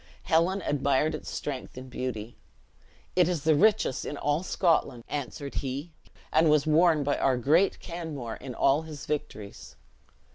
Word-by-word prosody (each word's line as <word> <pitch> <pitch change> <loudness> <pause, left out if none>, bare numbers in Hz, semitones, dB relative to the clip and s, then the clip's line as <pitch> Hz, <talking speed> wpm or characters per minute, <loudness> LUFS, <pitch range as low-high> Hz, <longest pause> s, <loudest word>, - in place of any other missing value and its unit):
Helen 180 +3 +2
admired 140 +2 +1
its 155 - -6
strength 135 -3 -5
and 130 +1 -8
beauty. 120 -3 -5 0.8
"It 180 -1 +4
is 170 -5 -2
the 160 - +4
richest 205 - +3
in 145 - -5
all 145 +3 0
Scotland," 165 -9 +1
answered 140 0 -5
he; 140 +5 -5 0.4
"and 160 +1 +5
was 150 -2 +4
worn 155 0 +4
by 145 +1 0
our 130 -2 +2
great 160 +10 +3
Canmore 155 -9 -6
in 125 -3 -8
all 140 +3 +3
his 155 -2 -9
victories." 110 -9 -5
150 Hz, 150 wpm, -28 LUFS, 130-165 Hz, 0.8 s, and